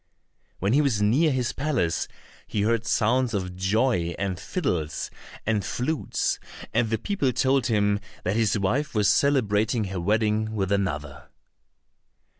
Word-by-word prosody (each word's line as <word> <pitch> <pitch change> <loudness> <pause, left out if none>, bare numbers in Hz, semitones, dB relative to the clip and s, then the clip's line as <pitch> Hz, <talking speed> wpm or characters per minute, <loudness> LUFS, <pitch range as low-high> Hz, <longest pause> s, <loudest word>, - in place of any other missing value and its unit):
When 100 +4 0
he 145 - +5
was 135 -8 +1
near 130 +10 +3
his 125 -2 -1
palace, 135 - 0 0.4
he 105 - -1
heard 115 0 +1
sounds 120 +2 +2
of 90 -2 -3
joy, 95 -2 +1
and 95 -2 -2
fiddles, 90 - -2 0.3
and 110 -2 +1
flutes, 125 - -1 0.3
and 115 - +2
the 110 - +1
people 165 - 0
told 135 +1 +2
him 105 -3 +2 0.2
that 95 +3 0
his 110 -2 +2
wife 125 +9 0
was 105 -2 +3
celebrating 110 -2 +2
her 90 - -2
wedding 110 +2 +1
with 95 -2 -1
another. 75 -8 -2
110 Hz, 140 wpm, -25 LUFS, 100-130 Hz, 0.4 s, he